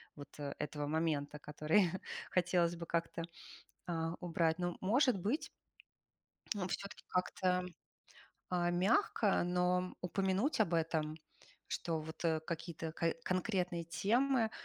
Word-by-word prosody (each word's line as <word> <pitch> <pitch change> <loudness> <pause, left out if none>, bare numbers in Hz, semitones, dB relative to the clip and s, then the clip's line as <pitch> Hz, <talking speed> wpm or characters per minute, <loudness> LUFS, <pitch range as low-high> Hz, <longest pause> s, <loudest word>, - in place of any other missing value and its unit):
вот 145 -1 -9
этого 145 +1 -3
момента, 150 -2 0
который 155 +5 +2 0.4
хотелось 175 -1 +3
бы 170 0 -6
как-то, 165 0 -1 0.7
а, 165 -1 -1
убрать. 165 -1 +1
Но, 175 -1 -1
может 245 +3 +4
быть, 220 - -1 1.2
все-таки 200 +2 -5
как-то, 180 0 +1 0.8
а, 175 -1 +1
мягко, 195 - +3
но 180 +1 +1
упомянуть 190 - +1
об 190 -6 +3
этом, 160 -2 0 0.5
что, 165 -2 -1
вот, 160 +2 -8 0.2
какие-то 165 -1 -4
ко-конкретные 180 +2 0
темы 230 +7 +2
175 Hz, 100 wpm, -36 LUFS, 160-185 Hz, 1.2 s, может